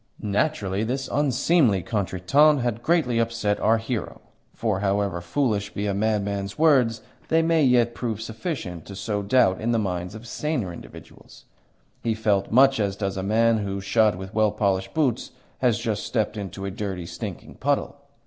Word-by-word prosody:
Naturally 100 -2 0
this 130 +4 -2
unseemly 135 - +2
contretemps 115 +8 +2
had 120 -2 -2
greatly 150 -8 +2
upset 115 -3 0
our 115 +1 +3
hero; 115 -2 -4 0.3
for, 110 -5 -1
however 100 -3 0
foolish 105 - -1
be 100 - -2
a 100 - 0
madman's 100 -1 -1
words, 130 -8 +3 0.2
they 165 0 +3
may 165 -1 +3
yet 120 -3 +3
prove 115 -3 -3
sufficient 110 - -5
to 100 - -8
sow 105 +1 -2
doubt 100 -2 +3
in 115 +2 0
the - - +2
minds 90 -2 -3
of 110 +2 -10
saner 125 - -2
individuals. - - -13 0.6
He 115 -1 0
felt 105 -3 0
much 135 +2 +5
as 100 -2 0
does 100 -1 -3
a 95 - -3
man 110 +3 +2
who, 100 -1 -3
shod 105 +1 +2
with 95 +1 -8
well 110 -1 +3
polished 100 0 -1
boots, 130 -6 0 0.3
has 120 -3 +2
just 110 -3 -2
stepped 110 -3 -1
into 100 -2 -6
a 100 - -3
dirty, 95 -4 -4
stinking - - -7
puddle. - - 0
110 Hz, 170 wpm, -24 LUFS, 100-120 Hz, 0.6 s, much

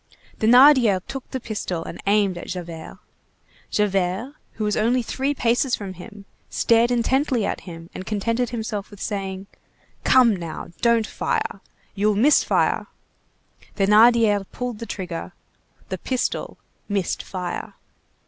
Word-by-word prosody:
Thénardier 245 -3 +6
took 270 -2 -7
the 260 - -3
pistol 195 -7 -4
and - - -8
aimed 200 -2 +3
at 175 - -8
Javert. 170 -3 -7 0.7
Javert, 195 +4 0 0.2
who 220 - -4
was 210 -1 0
only 240 +3 +2
three 270 +4 -2
paces 240 +1 +2
from 195 -3 -7
him, 200 +3 -12 0.2
stared 230 +1 +3
intently 245 -1 +1
at - - -3
him 165 0 -9
and - - -6
contented 230 +4 -1
himself 220 -3 -4
with 205 - -13
saying:— 195 -2 -4 0.6
"Come 245 -5 +5
now, 170 -3 -6
don't 235 -2 +3
fire. 450 - -2 0.3
You'll 210 +1 +1
miss 270 +9 +5
fire." - - +1 0.9
Thénardier 210 0 +5
pulled 245 -3 -4
the 230 - -6
trigger. 180 -4 -5 0.6
The - - -4
pistol 255 -2 -2 0.3
missed 200 -3 -1
fire. 180 -2 -5
215 Hz, 130 wpm, -23 LUFS, 195-245 Hz, 0.9 s, Thénardier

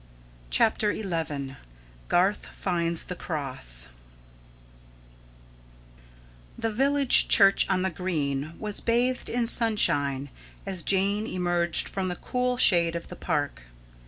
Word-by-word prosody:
CHAPTER 210 - +1
XI 155 -9 -5 0.5
GARTH 190 +4 0
FINDS 170 -3 -2
THE 180 - -7
CROSS 130 - -2 2.7
The 225 - -2
village 275 +3 +4
church 195 -2 +5
on 185 -1 0
the 190 - -2
green 155 -4 -4
was 210 -2 +1
bathed 245 +2 -1
in 240 0 -1
sunshine 145 - +2 0.4
as 190 -3 -3
Jane 200 +4 0
emerged 175 -2 0
from 190 -1 -4
the 180 - -4
cool 250 +5 -3
shade 170 -8 +4
of 170 - -7
the - - -9
park. 145 - -4
180 Hz, 110 wpm, -25 LUFS, 155-215 Hz, 2.7 s, church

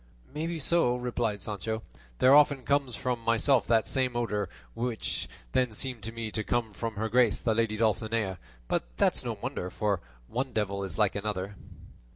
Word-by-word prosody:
"Maybe 165 +3 -2
so," 155 -4 +3
replied 120 -5 -1
Sancho; 110 +2 -3 0.3
"there 130 - +6
often 145 -2 +6
comes 140 -3 +1
from 125 -2 -1
myself 115 +3 +3
that 115 -2 +3
same 130 -2 0
odour 105 -5 -1 0.2
which 120 - -2 0.2
then 125 -3 +2
seemed 125 +1 -1
to 110 +2 -4
me 115 -1 -4
to 110 0 -1
come 115 -1 -1
from 115 +2 -4
her 110 +2 -1
grace 120 -1 +3
the 115 - +1
lady 110 -1 +1
Dulcinea; 110 -3 +1 0.3
but - - +1
that's - - +3
no - - -2
wonder, 90 - -4
for 100 -1 0 0.3
one 130 +3 -2
devil 100 -2 -1
is 95 -3 -5
like 105 -3 +3
another." 100 -1 -3
115 Hz, 175 wpm, -29 LUFS, 105-125 Hz, 0.3 s, there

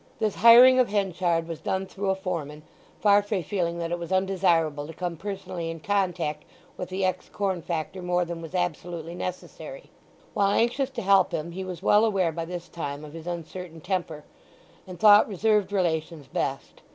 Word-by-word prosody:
This 215 -3 0
hiring 245 +3 +8
of 250 - +3
Henchard 180 -5 0
was 165 -2 -6
done 190 0 -1
through 195 +1 -4
a 190 - +2
foreman, 165 -6 -5 0.4
Farfrae 205 -2 +3
feeling 170 -1 -2
that 170 0 -3
it 175 - -2
was 170 +1 -7
undesirable 175 -6 +1
to 160 - -10
come 175 -1 -3
personally 185 -2 -5
in 165 0 -6
contact 175 -5 -1 0.3
with 180 - -6
the 190 +1 -1
ex 185 - -2
corn 190 -4 -2
factor 170 +2 -4
more 180 0 0
than 170 -1 -6
was 165 +2 -8
absolutely 170 -1 -3
necessary. 185 - -7 0.4
While 200 0 +2
anxious 250 +3 +1
to 260 -4 -6
help 195 -1 +4
him 160 +2 -3
he 190 +2 -5
was 185 -1 -7
well 210 +2 +5
aware 195 -6 +2
by 165 +1 -4
this 175 0 -6
time 145 -2 -6
of 150 - -12
his 165 0 -9
uncertain 170 0 -6
temper, 170 -3 -3 0.6
and 180 -2 -9
thought 210 0 +7
reserved 210 0 +1
relations 165 -5 -1
best. 135 +1 -4
180 Hz, 180 wpm, -26 LUFS, 165-195 Hz, 0.6 s, hiring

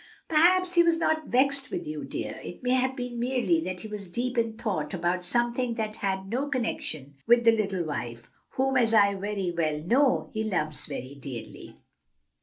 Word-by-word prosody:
"Perhaps 360 +3 +4
he 345 - +6
was 335 -1 +4
not 315 -2 0
vexed 275 +2 +2
with 360 -2 -4
you, 305 - -5
dear; - - -5
it - - -9
may 250 - +1
have 260 0 +2
been 245 -2 -5
merely 260 +7 +1
that 185 -1 -4
he - - -7
was 210 -2 -6
deep 245 +7 -2
in 230 -2 0
thought 195 -8 -2
about 175 +1 0
something 240 +4 0
that 215 -1 -3
had 190 -1 -2
no 255 +7 -1
connection 155 - -3
with 240 0 +6
the 230 - +7
little 200 -5 0
wife, 120 -6 -5 0.3
whom, 265 0 +1
as 230 -2 +3
I 200 -2 +6
very 195 -2 -2
well 155 -3 0
know, 250 - +2
he 220 -1 -1
loves 155 -8 -2
very 135 -2 -6
dearly." 135 -4 -9
230 Hz, 190 wpm, -27 LUFS, 180-260 Hz, 0.3 s, the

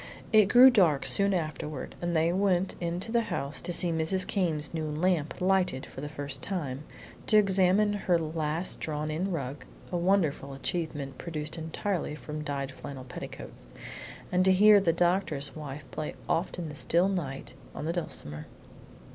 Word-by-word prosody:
It 215 -1 +7
grew 250 +6 +8
dark 175 - +3
soon 200 0 +2
afterward 155 -5 -3
and 175 0 -1
they 165 +2 +3
went 190 -1 +1
into 175 +5 -3
the 235 0 +3
house 140 -9 -3
to 175 - -4
see 175 0 +5
Mrs. 165 +4 +1
Came's 165 -6 -1
new 160 -2 -2
lamp 160 0 0
lighted 185 -7 +1
for - - -10
the 145 - -5
first 145 -1 -3
time, 150 -7 -4 0.4
to 215 - +5
examine 195 +1 +4
her 190 -4 +1
last 160 +1 -2
drawn 155 0 -3
in 180 +6 -2
rug 140 -4 -4 0.3
(a 175 - 0
wonderful 170 -7 +1
achievement 145 -3 -4
produced 155 -3 -5
entirely 165 0 -3
from 150 0 -6
dyed 140 -2 -3
flannel 135 0 -8
petticoats), 125 - -9 0.6
and 180 0 +3
to 190 - +5
hear 205 +2 +7
the 180 -4 +2
doctor's 170 -4 0
wife 145 -2 -7
play 155 - -4
"Oft 170 +3 -1
in 175 -2 -4
the - - -7
Still 170 +5 +2
Night," 145 -10 -4 0.2
on 150 - -5
the 165 - -1
dulcimer. 75 - -6
165 Hz, 165 wpm, -29 LUFS, 150-185 Hz, 0.6 s, grew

